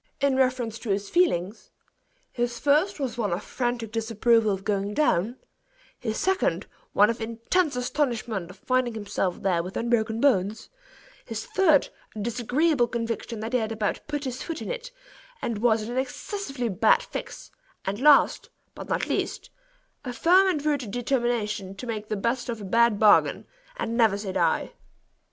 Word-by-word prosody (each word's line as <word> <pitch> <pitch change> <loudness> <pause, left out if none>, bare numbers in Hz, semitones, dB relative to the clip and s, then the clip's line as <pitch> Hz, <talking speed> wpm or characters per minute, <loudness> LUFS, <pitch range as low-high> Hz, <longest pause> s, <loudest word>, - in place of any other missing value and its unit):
In 275 -1 +2
reference 255 -4 0
to 235 - -7
his 200 0 -1
feelings 215 - +1 0.6
his 240 -1 -2
first 300 +9 +2
was 255 -3 -3
one 210 -5 0
of 175 +4 -2
frantic 240 -3 -3
disapproval 225 0 +2
of 195 -1 -3
going 200 0 -1
down; 235 - +2 0.6
his 220 -2 -3
second, 380 0 0 0.3
one 210 +3 +5
of 230 - -7
intense 230 +8 0
astonishment 245 - -2
of 185 - -12
finding 255 +1 0
himself 200 -4 -2
there 180 -3 +2
with 180 +3 -6
unbroken 230 -1 0
bones; 220 -5 +1 0.5
his 225 -2 -5
third, 325 -7 +3 0.3
a - - -6
disagreeable 245 +5 +1
conviction 230 -1 -4
that 225 +3 -5
he 250 - +3
had 220 -1 -2
about 215 -2 -1
put 295 -1 -3
his 260 -1 -4
foot 330 -2 -4
in - - -5
it, - - -5 0.5
and 230 - -3
was 225 -1 +2
in 225 - -6
an 250 - 0
excessively 270 - -4
bad 465 - +3
fix; - - -7 0.3
and 200 +2 -2
last, 295 0 +5 0.2
but - - -9
not - - 0
least, - - -3 0.5
a 255 - -4
firm 365 +8 +5
and 305 -6 0
rooted 285 -7 0
determination 235 -5 -1
to 220 - -8
make 215 -3 -4
the 215 - -2
beet 240 +4 -1
of 230 -2 -3
a 205 - -7
bad 230 +2 +3
bargain, 210 -2 +4 0.3
and 230 - -2
never 225 -4 +4
say 200 -2 -4
die. - - 0
235 Hz, 170 wpm, -26 LUFS, 215-265 Hz, 0.6 s, one